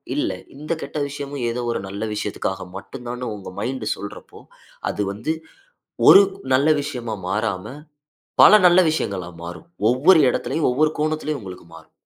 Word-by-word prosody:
இல்ல - - 0 0.2
இந்த 150 +3 -7
கெட்ட - - -6
விஷயமும் 140 -2 -6
ஏதோ 120 +1 -3
ஒரு - - -2
நல்ல 100 +2 -5
விஷயத்துக்காக 105 -3 -3
மட்டும் 125 +6 -10
தானு 125 -1 -4
உங்க 100 - -9
மைண்ட் 120 +1 -3
சொல்றப்போ 100 +1 -10 0.5
அது - - -4
வந்து 115 +11 -2 0.8
1 200 - +10 0.3
நல்ல 140 +4 +2
விஷயமா 125 -6 -4
மாறாம 105 +2 -2 0.7
பல 215 - +9
நல்ல 175 +1 +7
விஷயங்களா 100 - -3
மாறும். 85 +1 -8 0.2
ஒவ்வொரு 160 +7 +5
இடத்திலும் 140 +6 -1
ஒவ்வொரு 155 +4 +2
கோணத்திலும் 155 -1 -1
உங்களுக்கு 90 -3 -10
மாறும். 80 -1 -16
125 Hz, 145 wpm, -22 LUFS, 100-150 Hz, 0.8 s, 1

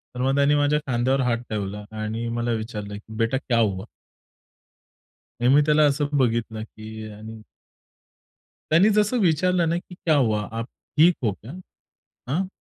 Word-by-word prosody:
तर 125 - -3
मग 135 +1 +2
त्यांनी 140 +1 +4
माझ्या 145 +1 +2
खांद्यावर 130 +2 +1
हात 120 -2 +1
ठेवला 105 -1 -4 0.2
आणि 110 +2 -3
मला 120 0 -1
विचारलं 110 -2 -4
की 110 +1 -13
"बेटा 115 +3 +1
क्या 120 -4 0
हुआ?" 100 -2 0 1.5
आणि 120 +1 +2
मी 150 - +6
त्याला 155 0 +4
असं 145 0 +1
बघितलं 115 -3 0
की 110 0 -9
आणि 110 +1 -10 1.3
त्यांनी 185 +7 +6
जसं 210 +4 +2
विचारलं 180 -1 +2
ना 170 - +1
की 180 0 -10
"क्या 160 -3 +1
हुआ, 110 -6 +2
आप 115 +1 -4 0.3
ठीक 170 +3 +6
हो 110 - +2
क्या? 105 +6 -11 0.8
हाँ?" 185 +7 0
120 Hz, 155 wpm, -24 LUFS, 110-150 Hz, 1.5 s, मी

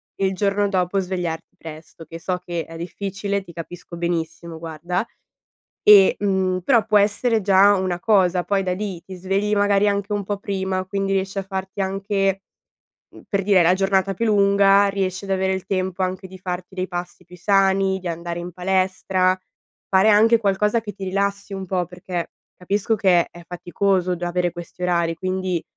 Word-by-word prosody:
e 195 - +1
il 190 - -2
giorno 200 +1 +1
dopo 185 0 0
svegliarti 175 -3 -4
presto 160 +1 -11
che 165 +2 -9
so 180 +2 -2
che 170 -2 -3
è 165 - -10
difficile, 195 +3 -3
ti 190 - -13
capisco 170 +1 -9
benissimo, 170 -1 -3
guarda, 165 +3 -3 0.8
e, 200 -2 +8
mhmm, 190 -2 0
però 230 +4 +3
può 215 -1 +4
essere 215 +3 +2
già 200 +1 +5
una 185 -2 -1
cosa, 180 -3 +2
poi 200 -1 +1
da 185 - -1
lì 190 -2 -4
ti 190 - -10
svegli 195 +3 0
magari 205 0 +3
anche 200 +1 -1
un 205 - -1
po' 205 +1 -2
prima, 190 -2 -2
quindi 195 0 -2
riesci 195 +1 -1
a 195 - -1
farti 190 0 -5
anche, 195 0 -1 0.7
mhmm, - - -13
per 200 -2 0
dire 195 -1 +4
hai - - +5
la 175 - +5
giornata 195 0 +1
più 230 +5 -2
lunga, 200 -1 +4
riesci 195 -1 -2
ad 200 - -8
avere 190 0 +1
il 190 0 -4
tempo 185 -1 -1
anche 185 +1 -3
di 185 0 -12
farti 180 0 -6
dei 185 0 -2
passi 175 0 -6
più 180 +1 -14
sani, 195 0 +2
di 185 - -6
andare 170 +1 -4
in 175 +1 -6
palestra, 185 0 +1 0.5
fare 190 +3 +4
anche 225 +2 +6
qualcosa 210 +2 +1
che 210 - -6
ti 195 -1 -7
rilassi 200 +1 -2
un 195 -1 -5
po', 180 -1 -1
perché 180 0 -6 0.3
capisco 200 +4 0
che 185 -4 +3
è 175 - -12
faticoso 180 0 0
già 175 - -3
avere 175 0 0
questi 175 +1 -10
orari, 170 -2 +1
quindi, 185 -1 -2
190 Hz, 185 wpm, -22 LUFS, 180-200 Hz, 0.8 s, e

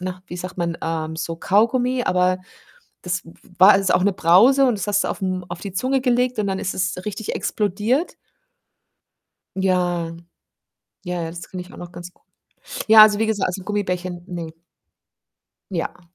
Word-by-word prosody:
na, 185 0 -6
wie 175 - -7
sagt 180 +1 -7
man? 170 -1 -2
Ähm, 160 -1 -3
so 165 +1 -4
Kaugummi, 245 +7 +2
aber 185 0 +2 0.7
das 180 0 -2
w 165 - -13 0.3
war 195 +1 +8
ist 195 -1 +1
auch 180 - +3
'ne 200 -1 +2
Brause 230 +12 +5
und 240 -5 +1
das 200 - -4
hast 205 0 +2
du - - -2
auf - - -5
'm 185 -1 -2
auf 175 - -6
die 200 -3 -6
Zunge 260 +6 0
gelegt 250 -1 +1
und 205 - 0
dann 190 -1 -1
ist 190 - -2
es 185 +1 -1
richtig 210 +1 -4
explodiert. 215 - -1 1.4
Ja. 175 -3 0 0.9
Ja, 180 -1 -3
ja, 165 - -4
das 170 +1 -9
kenne 185 - -6
ich 180 - -12
auch - - -12
noch 175 0 -9
ganz 175 0 -9
gu - - -34 0.7
ja, 215 0 +10
also 210 -1 +4
wie 225 - +1
gesagt, 210 -3 0
also 180 +1 -4
Gummibärchen, 180 -3 -3
ne. 170 -3 -6 1.2
Ja. 175 0 -4
185 Hz, 180 wpm, -21 LUFS, 175-210 Hz, 1.4 s, ja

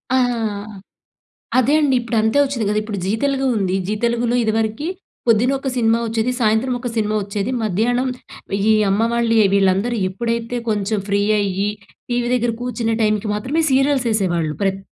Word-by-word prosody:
ఆహా! 245 -2 +2 1.2
అదే 265 +4 +2
అండి. 285 -4 +2
ఇప్పుడంతే 230 +1 +1
వచ్చిద్ది 260 -6 -2
గదా! 210 +1 +1
ఇప్పుడు 215 -2 -5
'జీ 190 - -1
తెలుగు' 275 -1 +1
ఉంది. 190 -2 0
'జీ 210 - -1
తెలుగులో' 235 +1 +1
ఇదివరకి 220 +6 -1 0.4
పొద్దునొక 255 +5 +2
సినిమా 230 -1 +2
వచ్చేది. 225 +2 0
సాయంత్రం 225 +3 +2
ఒక 245 - -4
సినిమా 215 -1 0
వచ్చేది. 200 +3 -3
మధ్యానం 230 +5 0 0.6
ఈ - - +6 0.2
అమ్మ 205 +3 +2
వాళ్ళే 230 -2 +3
వీళ్ళందరూ 195 +4 +2
ఎప్పుడైతే 230 +3 -3
కొంచెం 210 0 0
ఫ్రీ 200 0 +1 0.2
అయ్యి 200 0 0 0.4
టీవీ 240 0 0
దెగ్గర 240 -1 +1
కూర్చునే 230 -2 -1
టైమ్ 215 -1 +3 0.2
మాత్రమే 270 +10 -1
సీరియల్స్ 270 -1 +2
ఎసేవాళ్ళు. 175 -7 0
ప్రత్ 195 0 0
225 Hz, 150 wpm, -19 LUFS, 210-245 Hz, 1.2 s, ఈ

